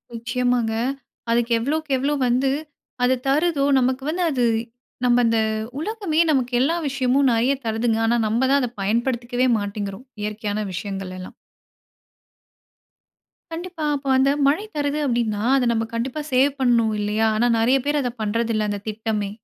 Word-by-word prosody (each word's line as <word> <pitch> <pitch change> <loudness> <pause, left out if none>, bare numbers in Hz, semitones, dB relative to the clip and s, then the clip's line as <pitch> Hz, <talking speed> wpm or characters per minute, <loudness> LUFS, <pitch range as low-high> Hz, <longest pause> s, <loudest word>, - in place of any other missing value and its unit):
நிச்சயமாங்க. 240 0 0 0.6
அதுக்கு 235 0 +1
எவ்வளோக்கு, 305 +6 -2
எவ்ளோ 280 +3 0
வந்து 255 +2 +2 0.5
அது 255 +1 +4
தருதுதோ, 295 +1 +2
நமக்கு 260 +1 0
வந்து 350 +3 -1
அது 255 -4 0 0.6
நம்ப 245 0 +4
அந்த 230 0 +2 0.4
உலகமே 385 -3 -2
நமக்கு 255 -3 0
எல்லா 310 +6 +2
விஷயமும் 270 0 +2
நெறைய 240 +4 +2
தருதுங்க. 225 0 0
ஆனா 235 +1 +2
நம்ம 225 +3 0
தான் 280 0 +4
அத 250 - -1
பயன்படுத்திக்கவே 240 +4 0
மாட்டேங்கிறோம். 205 +2 -5 0.2
இயற்கையான 210 0 -3
விஷயங்களெல்லாம். 185 -1 -6 2.2
கண்டிப்பா! 340 0 -6
அப்ப 275 -1 -6
அந்த 265 +1 +4 0.2
மழை 310 +9 +2
தருது 290 0 -1
அப்படீன்னா 235 -5 0
அதை 265 -2 +2
நம்ம 225 -1 0
கண்டிப்பா 250 +6 -2
சேவ் 270 +2 +3
பண்ணனும். 235 -4 +3
இல்லையா? 210 +2 +1
ஆனா 235 +3 +2
நெறைய 240 +4 +3
பேர் 295 0 +1
அத 250 - -1
பண்றதில்லை, 220 0 0
அந்த 205 0 -3
திட்டமே. 215 -1 -2
245 Hz, 140 wpm, -22 LUFS, 220-275 Hz, 2.2 s, அது